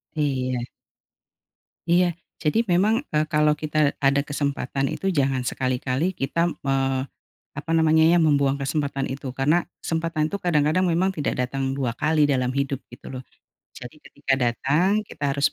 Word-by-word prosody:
Iya. 130 -5 -1 1.2
Iya. 175 -1 +3 0.2
Jadi 195 +10 +1
memang, 200 +6 +3 0.2
eee, 150 0 +2
kalau 150 0 +4
kita 155 0 -3 0.2
ada 140 0 +3
kesempatan 140 -1 -2
itu - - -6
jangan 135 -4 +1
sekali-kali 130 +7 -1
kita 170 +6 0 0.2
me 135 - +2 0.8
apa 150 +2 -5
namanya 160 0 +4
ya, 170 +2 +5
membuang 140 -3 +2
kesempatan 140 -1 -2
itu, 135 -1 -5
karena 150 +7 +2 0.2
kesempatan 165 -1 -1
tu 200 - -4
kadang-kadang 160 +1 +2
memang 175 +3 +2
tidak 145 -4 -2
datang 135 0 -2
2 120 -4 -2
kali 155 +1 +2
dalam 130 -3 +1
hidup 140 0 -2
gitu 120 - -12
loh. 130 0 -6 0.5
Jadi 125 +5 -10
ketika 140 -2 -4
datang 150 - +1
kita 145 - -8
harus 140 - +2
145 Hz, 145 wpm, -24 LUFS, 135-160 Hz, 1.2 s, ya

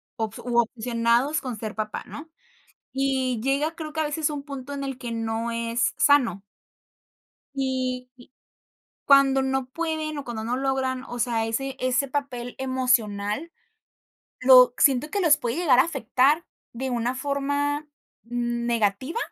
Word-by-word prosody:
obs 220 -3 -4
u 245 -1 -2
obsesionados 235 +4 +1
con 250 -4 -5
ser 215 0 -6
papá, 215 -1 -4
¿no? 310 +2 -9 0.6
Y 265 -3 0
llega, 280 +5 0
creo 310 -2 -7
que 315 - -1
a - - +2
veces 300 +1 -1
un 295 -2 -5
punto 280 -1 -7
en 275 0 -4
el 270 -2 -5
que 245 -2 -6
no 225 0 -2
es 230 +1 -1
sano. 250 -10 +3 1.1
Y 255 -2 -2
y 245 -1 -18 0.7
cuando 275 -1 +5
no 265 -1 -1
pueden, 315 +1 -3
o 285 - -5
cuando 230 -3 -5
no 240 +2 -1
logran, 265 -1 -1
o 245 - -7
sea, 230 -2 0
ese 270 +4 -3
ese 255 +2 +1
papel 255 -3 -4
emocional, 255 0 0 0.9
lo 255 -1 +7
siento 275 +2 +3
que 405 - -1
los 320 -5 +5
puede 240 -3 -3
llegar 325 -8 +4
a - - +8
afectar 285 +1 +2 0.3
de 260 +3 -4
una 240 +1 -1
forma 285 +2 -1 0.4
negativa 235 - -1
260 Hz, 150 wpm, -25 LUFS, 235-280 Hz, 1.1 s, a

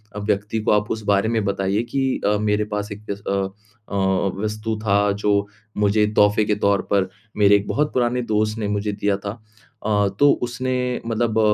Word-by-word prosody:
अ, - - -4
व्यक्ति 105 +1 -1
को - - +1
आप 105 0 +1
उस 110 - -3
बारे 100 +2 +2
में 115 -2 0
बताइए 100 +1 0
कि 135 -1 +1 0.2
अ, 105 0 +3
मेरे 105 0 +1
पास 105 +1 -3
एक 105 +1 -8
एस 100 0 -5
अ - - 0 0.6
अ, 100 - -4 0.5
वस्तु 110 +1 -2
था 100 0 +3
जो 100 0 +1 0.3
मुझे 105 +1 +3
तोहफ़े 105 +1 +4
के 105 - +1
तौर 100 -2 +2
पर 95 -2 +2 0.3
मेरे 100 -1 +6
एक 100 - -5
बहुत 150 +1 0
पुराने 125 0 +1
दोस्त 110 -1 0
ने 105 - -1
मुझे 105 0 -1
दिया 100 -1 0
था। 100 0 -5 0.5
अ, 105 -2 +2
तो 145 0 +6
उसने 125 +1 -2
मतलब 115 -1 0
105 Hz, 190 wpm, -22 LUFS, 100-110 Hz, 0.6 s, मेरे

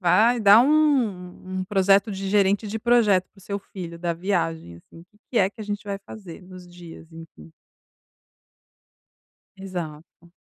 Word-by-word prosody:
vai 215 +7 +3
dar 210 +1 +7
um 225 -11 0
um - - -3
projeto 195 +2 +2
de 195 0 -5
gerente 200 +1 +2
de 220 +2 -4
projeto 215 -5 +3
para 195 - -23
o - - -17
seu 200 +1 -4
filho 175 -4 -9
da 170 0 -2
viagem, 165 - -3
assim, 165 - -17 0.3
"que 240 - +1
é 190 - +3
que 220 - -15
a - - -5
gente 205 0 -5
vai 200 -1 -4
fazer 195 -4 -12
nos 180 -1 -13
dias", 170 -2 -13
enfim. 155 - -14 2.0
Exato. 170 -3 -9
190 Hz, 155 wpm, -23 LUFS, 175-205 Hz, 2.0 s, dar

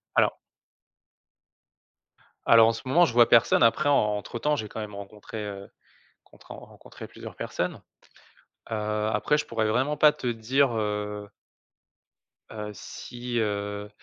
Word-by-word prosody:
Alors - - +3 2.1
Alors, 115 -1 +7
en 115 - +2
ce 115 - -7
moment, 170 +7 +5
je 125 - -3
vois 120 -1 +6
personne. 120 0 +5
Après, 140 +6 +3
en 145 - +5
entre 105 0 -1
temps, 150 +5 +1
j'ai 110 -7 -4
quand 110 - -7
même 105 -2 -6
rencontré, 105 +2 -8
heu, 100 -1 -8 0.5
contré - - -14
rencontré - - -12
plusieurs - - -11
personnes. - - -4 0.9
Heu, 105 -1 -1
après, 150 +8 +1
je - - -2
pourrais 110 -1 -1
vraiment 130 +7 0
pas 150 0 +6
te - - -8
dire, 120 +2 +1
heu 105 -1 -3 1.2
heu, 105 -1 -6
si, 120 +3 -6
heu, 105 -1 -3
110 Hz, 140 wpm, -26 LUFS, 105-125 Hz, 2.1 s, Alors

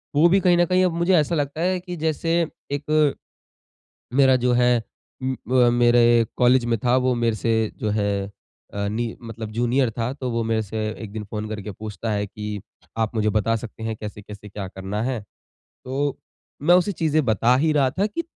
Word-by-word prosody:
वो 160 +4 +6
भी 195 +2 +4
कहीं 180 -2 +4
न 175 - +4
कहीं 185 +2 +2
अब 175 - 0
मुझे 170 +3 +1
ऐसा 165 +1 +2
लगता 145 +1 -2
है 185 +1 +1
कि 180 0 -7
जैसे 160 +1 -1 0.4
एक, 150 0 +2 1.0
मेरा 135 -1 +5
जो 125 0 +1
है 120 -1 +3 0.4
उम, 130 0 -1
ब 125 -1 +4
मेरे 120 -1 +4
कॉलेज 125 0 +4
में 115 -2 0
था 125 +1 +4
वो 130 0 +2
मेरे 115 -2 0
से 110 0 0
जो 105 - -1
है 100 -1 0 0.5
अ, 100 0 -1
नि 115 +2 -3
मतलब 115 -1 -7
जूनियर 120 +2 +1
था। 115 +3 -1
तो 130 -2 -4
वो 115 0 -1
मेरे 110 -1 0
से 110 +1 -3
एक 105 -2 -8
दिन 110 -1 -5
फ़ोन 105 +1 -5
करके 105 -1 -5
पूछता 110 +2 -6
है 105 0 -1
कि 105 0 -6 0.4
आप 110 0 0
मुझे 110 -1 +1
बता 110 +2 +1
सकते 110 0 -9
हैं 110 -1 -3
कैसे-कैसे 105 -1 -9
क्या 100 -1 -6
करना 95 +3 -4
है? 125 -2 -2 0.7
तो 140 +2 -2 0.4
मैं 175 +5 +5
उसे 185 +3 +2
चीजें 155 -3 +1
बता 115 +3 +3
ही 155 +4 +2
रहा 140 -3 +3
था 185 +10 -1
कि 335 +11 -3
120 Hz, 200 wpm, -23 LUFS, 110-145 Hz, 1.0 s, वो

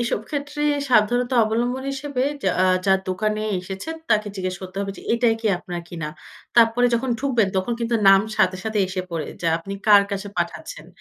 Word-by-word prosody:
এসব 235 -3 -1
ক্ষেত্রে 290 0 -4 0.3
সাবধানতা 245 +2 +3
অবলম্বন 245 +4 -1
হিসেবে 275 -1 -3 0.2
যা 190 - +2
আ - - +5 0.2
যার 190 -1 +4
দোকানে 215 +3 -1 0.2
এসেছেন 190 - -6 0.2
তাকে 210 -1 +2
জিজ্ঞেস 185 -1 -3
করতে 185 +1 -9
হবে 195 0 -3
যে - - -11
এটাই 235 -1 +3
কি 225 - -2
আপনার 175 -3 -6
কিনা। 165 -4 -5 0.5
তারপরে 235 +1 +5
যখন 245 +2 -1
ঢুকবেন 240 -8 +2
তখন 190 +6 0
কিন্তু 235 0 -1
নাম 195 0 +8 0.2
সাথে, 185 0 +3
সাথে 220 -1 -1
এসে 185 0 -3
পড়ে 160 -3 -3 0.2
যা 165 - +2
আপনি 195 +4 -8
কার 205 -1 +8
কাছে 200 0 -4
পাঠাচ্ছেন। - - -4
215 Hz, 185 wpm, -22 LUFS, 190-245 Hz, 0.5 s, নাম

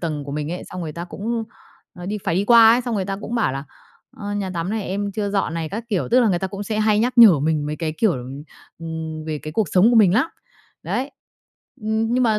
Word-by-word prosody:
tầng 155 -4 -3
của 140 - -6
mình 150 +2 -3
ấy, 180 - -5
xong 185 - -8
người 160 -2 -5
ta 170 +2 -6
cũng, 225 +5 -4 0.5
ờ, 180 0 -9
đi 210 +1 -3
phải 165 - 0
đi 195 - +1
qua 230 0 +8
ấy, 245 - +3
xong 240 -2 -3
người 195 -3 -1
ta 195 0 -3
cũng 235 - -5
bảo 220 - +1
là 135 +2 -5 0.5
"ờ, 205 -1 -5
nhà 195 -2 -2
tắm 170 +3 -2
này 220 -1 -2
em 200 +2 -3
chưa 205 0 -2
dọn 195 -5 -1
này" 160 -1 -3
các 220 +6 -5
kiểu, 195 -5 -1
tức 250 +2 +5
là 235 - +3
người 175 -3 +1
ta 190 - -2
cũng 195 +2 -6
sẽ 215 +1 -3
hay 215 -1 +3
nhắc 245 +2 0
nhở 200 -10 +9
mình 150 0 0
mấy 150 - -3
cái, 160 -1 -3
kiểu, 220 -5 +3 0.7
ừm, 160 -1 -6
về 155 -1 -3
cái 155 - -6
cuộc 205 -2 0
sống 190 +5 +5
của 240 - +3
mình 200 -4 +5
lắm. 255 +7 +3 0.6
Đấy, 270 +3 -2 0.7
ừm, 220 +1 -1
nhưng 255 - +2
mà 220 -3 +2
195 Hz, 265 wpm, -21 LUFS, 165-220 Hz, 0.7 s, nhở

